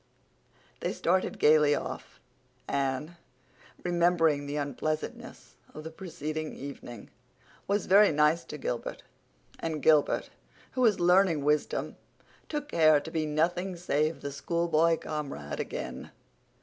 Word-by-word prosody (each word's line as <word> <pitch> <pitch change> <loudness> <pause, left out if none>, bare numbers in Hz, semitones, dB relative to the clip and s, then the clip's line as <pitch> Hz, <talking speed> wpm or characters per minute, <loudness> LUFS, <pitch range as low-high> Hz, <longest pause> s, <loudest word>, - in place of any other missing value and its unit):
They - - -2
started 185 +2 0
gaily 150 -1 +5
off. - - -6 0.5
Anne, 140 +4 -2 0.7
remembering 170 -4 +2
the 145 - -4
unpleasantness 150 +1 -4 0.2
of 155 - -7
the 160 - -7
preceding 155 -3 -5
evening, 120 -5 -9 0.6
was 200 0 0
very 200 +1 +6
nice 150 +2 +3
to 150 - -7
Gilbert; 125 -4 -4 0.6
and 160 -2 -3
Gilbert, 155 -2 +3 0.4
who 255 - -2
was 220 -5 +4
learning 175 -4 +4
wisdom, 150 0 0 0.5
took 295 -1 -4
care 155 - +5
to 160 - -9
be 160 -2 -1
nothing 175 +5 0
save 155 -2 -1
the 140 - -4
schoolboy 165 +2 +1
comrade 140 - -5
again. - - -5
155 Hz, 120 wpm, -29 LUFS, 150-175 Hz, 0.7 s, very